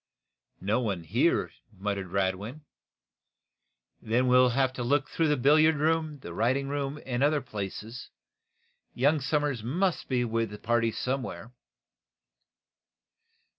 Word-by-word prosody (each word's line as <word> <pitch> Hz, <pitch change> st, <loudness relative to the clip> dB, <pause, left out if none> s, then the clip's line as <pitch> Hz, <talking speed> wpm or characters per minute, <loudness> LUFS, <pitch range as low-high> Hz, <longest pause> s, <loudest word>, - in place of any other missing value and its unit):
"No 105 Hz, +5 st, +1 dB
one 100 Hz, -8 st, -2 dB
here," 120 Hz, -, +1 dB, 0.2 s
murmured 100 Hz, -1 st, -3 dB
Radwin 100 Hz, -, -2 dB, 1.4 s
"Then 120 Hz, +3 st, +1 dB
we'll 125 Hz, 0 st, +6 dB, 0.3 s
look 135 Hz, +4 st, +1 dB
through 165 Hz, -, 0 dB
the 150 Hz, -1 st, +2 dB
billiard 155 Hz, +5 st, +5 dB
room, 155 Hz, 0 st, 0 dB
writing 125 Hz, +10 st, 0 dB
room 145 Hz, 0 st, -3 dB
and 125 Hz, -1 st, -2 dB
other 145 Hz, +1 st, +3 dB
places. 110 Hz, 0 st, -7 dB, 0.9 s
Young 145 Hz, +5 st, +3 dB
Somers 145 Hz, -3 st, 0 dB
must 175 Hz, -, -1 dB
be 125 Hz, -2 st, +1 dB
with 115 Hz, -1 st, -1 dB
the 105 Hz, -, -8 dB
party 115 Hz, +1 st, +1 dB
somewhere." 125 Hz, -1 st, -4 dB
125 Hz, 110 wpm, -28 LUFS, 110-145 Hz, 1.4 s, we'll